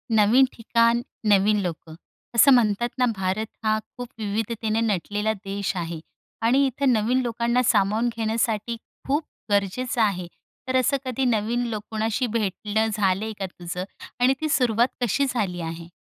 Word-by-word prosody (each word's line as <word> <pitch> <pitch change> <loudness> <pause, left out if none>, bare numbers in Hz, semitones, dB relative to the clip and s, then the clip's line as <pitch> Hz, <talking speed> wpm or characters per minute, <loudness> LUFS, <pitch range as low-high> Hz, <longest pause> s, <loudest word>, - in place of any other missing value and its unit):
नवीन 225 +6 +6
ठिकाण, 230 +1 +2 0.3
नवीन 210 +1 +4
लोकं. 165 -2 -5 0.4
असं 275 +5 +7
म्हणतात 235 -1 +2
ना, 250 - +3
भारत 190 +3 -1 0.2
हा 215 0 +2
खूप 245 +3 -10
विविधतेने 220 +1 -1
नटलेला 210 0 0
देश 200 -1 -4
आहे. 170 -1 -4 0.4
आणि 255 +5 +4
इथं 265 0 +1
नवीन 235 +4 +2
लोकांना 235 +1 0
सामावून 215 +2 +2
घेण्यासाठी 225 0 -1 0.3
खूप 290 +4 +1 0.3
गरजेचं 205 +5 0
आहे. 190 -5 +1 0.4
तर 260 - -1
असं 275 +3 +2
कधी 255 +1 -1
नवीन 235 +1 +1
लोक 215 -3 -4
कुणाशी 220 +3 0
भेटणं 215 0 -1
झालंय 205 +2 0
का 195 - -1
तुझं? 180 0 -6 0.4
आणि 250 +2 +4
ती 310 - -1
सुरुवात 245 -5 +3
कशी 245 +4 +2
झाली 185 -7 -2
आहे? 165 0 -6
220 Hz, 145 wpm, -24 LUFS, 200-240 Hz, 0.4 s, असं